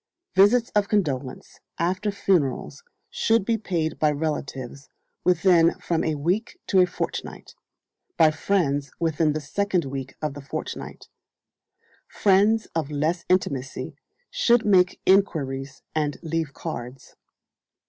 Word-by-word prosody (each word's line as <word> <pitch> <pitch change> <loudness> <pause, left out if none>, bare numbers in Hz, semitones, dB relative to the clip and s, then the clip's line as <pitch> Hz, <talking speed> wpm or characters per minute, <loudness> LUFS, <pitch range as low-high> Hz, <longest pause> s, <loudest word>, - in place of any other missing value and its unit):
Visits 215 +5 +4
of 205 -1 +2
condolence 140 -11 -2 0.2
after 185 +5 0
funerals 190 - 0 0.3
should 225 -3 +2
be 230 - +2
paid 175 -7 -2
by 155 - +3
relatives 140 -3 -4 0.3
within 175 -1 +4
from 165 -2 -1
a 155 - 0
week 180 +10 -2
to 190 - +3
a 180 - +5
fortnight; 180 - -5 0.6
by 155 -1 +6
friends 145 -4 0
within 160 -2 +1
the 155 - -2
second 180 +4 -1
week 135 -1 -6
of 150 -2 -3
the 145 - -9
fortnight; 135 - -7 1.0
friends 210 +3 +3
of 160 -3 -2
less 155 +4 -1
intimacy 140 -8 -1 0.4
should 240 - +3
make 185 -3 +4
enquiries 140 -9 +1
and 150 -2 -1
leave 165 -2 -2
cards. 130 -5 -7
165 Hz, 120 wpm, -24 LUFS, 145-195 Hz, 1.0 s, by